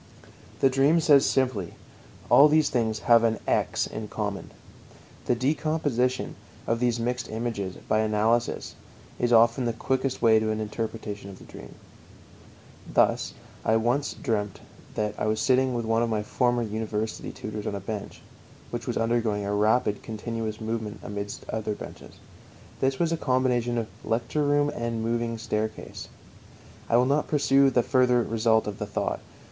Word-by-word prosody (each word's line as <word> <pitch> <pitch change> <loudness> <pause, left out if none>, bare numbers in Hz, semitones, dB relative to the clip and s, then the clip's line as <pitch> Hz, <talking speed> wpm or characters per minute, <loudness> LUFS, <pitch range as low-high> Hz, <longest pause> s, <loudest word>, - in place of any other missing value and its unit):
The 135 - +6
dream 140 +5 +4
says 145 -3 +5
simply: 125 -10 0 0.5
All 145 - +8
these 155 0 +3
things 110 -3 0
have 115 -1 +5
an 115 -1 +2
"x" - - +1
in 110 -1 -6
common. 105 -2 -4 0.8
The 125 - +3
decomposition 135 -2 0 0.3
of 115 0 0
these 120 -1 +1
mixed 125 +2 -2
images 110 -4 -3
by 110 - +2
analysis 110 +2 +1 0.5
is 120 0 +1
often 115 +2 +5
the 115 - 0
quickest 130 +3 -1
way 110 -2 +5
to 110 0 -1
an 110 0 -1
interpretation 110 -2 -5
of 95 - -10
the - - -14
dream. - - -12 1.2
Thus - - +2 0.3
I 110 - +3
once 120 +6 0
dreamt 105 - -2 0.4
that 105 -1 -1
I - - 0
was 110 0 0
sitting 130 +1 +2
with 120 -1 -2
one 115 +1 +2
of 120 - +1
my 110 -2 -1
former 120 +2 +1
university 110 0 -3
tutors 105 -1 -6
on 100 - -2
a - - -3
bench, 100 +1 -6 0.5
which - - -5
was - - -1
undergoing 115 -3 0
a 100 - -1
rapid 105 0 +2
continuous 110 0 -4
movement 110 -1 -4
amidst 100 0 -6
other 110 -1 -3
benches. - - -10 0.6
This 135 0 +1
was 165 +1 +1
a 165 - 0
combination 125 -3 +1
of 115 - 0 0.2
lecture 120 +6 -1
room 145 0 +3
and 115 -1 -3
moving 115 0 -1
staircase. 110 0 -4 0.8
I 115 - +4
will 125 - +4
not 140 +3 +1
pursue 140 -2 +4
the 125 -2 +2
further 125 -2 +3
result 110 0 +2
of 105 -1 -5
the - - -3
thought. - - -2
115 Hz, 160 wpm, -26 LUFS, 110-125 Hz, 1.2 s, All